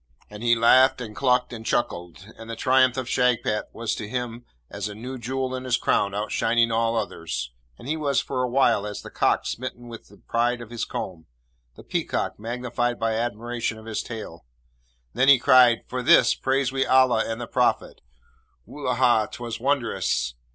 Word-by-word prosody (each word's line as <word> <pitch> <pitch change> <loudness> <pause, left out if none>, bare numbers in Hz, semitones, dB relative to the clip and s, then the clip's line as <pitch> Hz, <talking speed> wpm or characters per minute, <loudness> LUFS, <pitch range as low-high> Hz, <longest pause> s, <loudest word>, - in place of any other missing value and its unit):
And 105 0 -9
he 120 0 +3
laughed 130 +4 +5
and 110 -4 -7
clucked 125 -1 +1
and 115 -1 -7
chuckled, 90 -6 -2
and 115 0 -11
the 115 - -4
triumph 130 +1 +3
of 130 -2 -3
Shagpat 125 -4 +1
was 115 -1 -3
to 105 - -6
him 120 -1 -4 0.2
as 100 +1 -5
a 105 - -8
new 125 +4 -7
jewel 130 +2 -3
in 130 0 -4
his 125 -2 +1
crown 100 0 0
outshining 115 +2 +1
all 115 0 +1
others, 85 - -4 0.3
and - - -12
he 155 - 0
was 145 -4 0
for 130 -2 -3
awhile 120 -4 +2
as 105 - -7
the - - -10
cock - - +1
smitten 120 0 -5
with 115 -1 -10
the - - -18
pride 120 +1 -1
of 120 -1 -10
his 120 - -3
comb, 80 -4 -6 0.5
the - - -13
peacock - - -2
magnified 120 +1 -2
by 115 0 0
admiration 115 0 -3
of 110 - -13
his 110 -1 -3
tail. 105 -8 -8 0.7
Then 125 +4 +2
he 140 -1 +8
cried, 125 -2 +5
'For 125 0 -3
this, 125 - +5
praise 135 -1 0
we 135 0 +1
Allah 130 -3 +4
and 115 - -4
the 120 - -4
Prophet. - - 0 0.6
Wullahy, 125 -5 +1
'twas 120 -1 -6
wondrous!' 120 - 0
120 Hz, 180 wpm, -24 LUFS, 110-130 Hz, 0.7 s, he